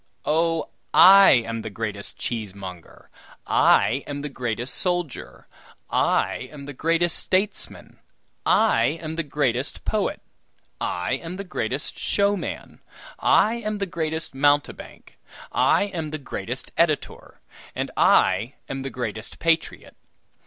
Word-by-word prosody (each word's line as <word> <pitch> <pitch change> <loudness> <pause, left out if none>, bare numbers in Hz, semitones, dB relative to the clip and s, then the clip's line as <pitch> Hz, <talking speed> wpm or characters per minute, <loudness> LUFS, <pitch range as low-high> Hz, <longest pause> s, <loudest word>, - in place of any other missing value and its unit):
Oh! 165 +1 +1 0.3
I 195 +1 +9 0.2
am 115 0 -4
the 110 - -6
greatest 105 -1 -5
cheesemonger, 95 -6 -7 0.3
I 135 +5 +3
am 145 0 -5
the 150 - -4
greatest 120 -1 -3
soldier, 175 -7 -3 0.4
I - - +1
am 145 -2 -10
the 145 - -7
greatest 165 +4 +1
statesman, 195 +2 -2 0.4
I 120 +8 +3
am 160 0 -5
the 165 - 0
greatest 140 -3 -2
poet, 215 -2 -1 0.6
I 90 +10 -1
am 170 +2 -6
the 200 - -5
greatest 135 - -4
showman, 200 -1 -1 0.4
I 225 +2 +4
am 215 0 -2
the 200 - -1
greatest 160 -3 -4
mountebank, 145 +1 -1 0.3
I - - +3
am 175 -6 -4
the 155 - -4
greatest 140 - -6
editor, - - -1 0.4
and - - -3
I 105 +8 +3
am 135 0 -4
the 135 - -4
greatest 110 -4 -5
patriot. 165 -1 -1
145 Hz, 125 wpm, -24 LUFS, 120-170 Hz, 0.6 s, I